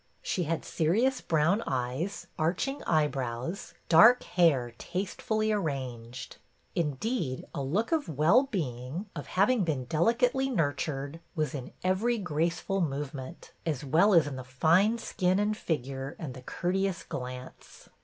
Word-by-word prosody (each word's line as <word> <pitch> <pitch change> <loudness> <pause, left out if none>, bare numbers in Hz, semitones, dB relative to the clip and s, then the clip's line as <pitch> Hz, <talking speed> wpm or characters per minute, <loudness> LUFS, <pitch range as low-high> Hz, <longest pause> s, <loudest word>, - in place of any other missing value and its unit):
She 180 - -1
had 165 +1 -2
serious 230 +12 +1
brown 165 +7 +2
eyes, 130 +10 -2
arching 180 - 0
eyebrows, 140 0 -1
dark 230 +9 +7
hair 140 -9 +2
taste 185 +1 -4
fully 215 0 +1
arranged; 130 - -4 0.4
indeed, 155 - -2
a - - -3
look 180 - -1
of 315 - +1
well 165 - +4
being, 135 - -3
of 145 - -6
having 205 +4 +3
been 145 -7 -1
delicately 240 - +2
nurtured, 145 - -1 0.2
was 155 -1 -1
in 130 -4 -6
every 205 +6 +2
graceful 175 +1 -1
movement, 140 0 -4
as 150 -4 -2
well 170 +9 +4
as 165 - +6
in 140 -2 -5
the 130 - -6
fine 165 - +3
skin 185 -5 0
and 210 +1 +1
figure 135 - -3
and 150 -6 -6
the 130 - -10
courteous 185 +6 -1
glance. 125 0 -8
165 Hz, 135 wpm, -29 LUFS, 135-200 Hz, 0.4 s, dark